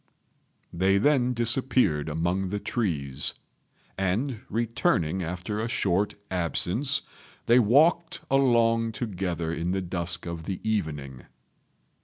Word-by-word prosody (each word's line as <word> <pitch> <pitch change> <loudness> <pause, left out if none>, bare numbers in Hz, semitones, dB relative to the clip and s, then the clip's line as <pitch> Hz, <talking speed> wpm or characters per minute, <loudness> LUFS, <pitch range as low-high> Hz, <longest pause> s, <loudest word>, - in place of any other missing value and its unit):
They 95 +3 +3
then 125 +1 +2
disappeared 120 - +1
among 85 +5 -1
the 105 +2 -2
trees; 75 - -1 0.6
and, 110 +6 -1
returning 100 -6 0
after 90 +5 -4
a 115 - -1
short 100 -3 0 0.2
absence, 95 - 0 0.4
they 120 +2 +5
walked 155 +9 +3
along 115 -4 +3
together 90 -7 -3
in 85 +2 -2
the 95 - -1
dusk 85 -1 -2
of 85 -2 -6
the 95 -2 -4
evening. 75 - -3
95 Hz, 110 wpm, -27 LUFS, 85-115 Hz, 0.6 s, they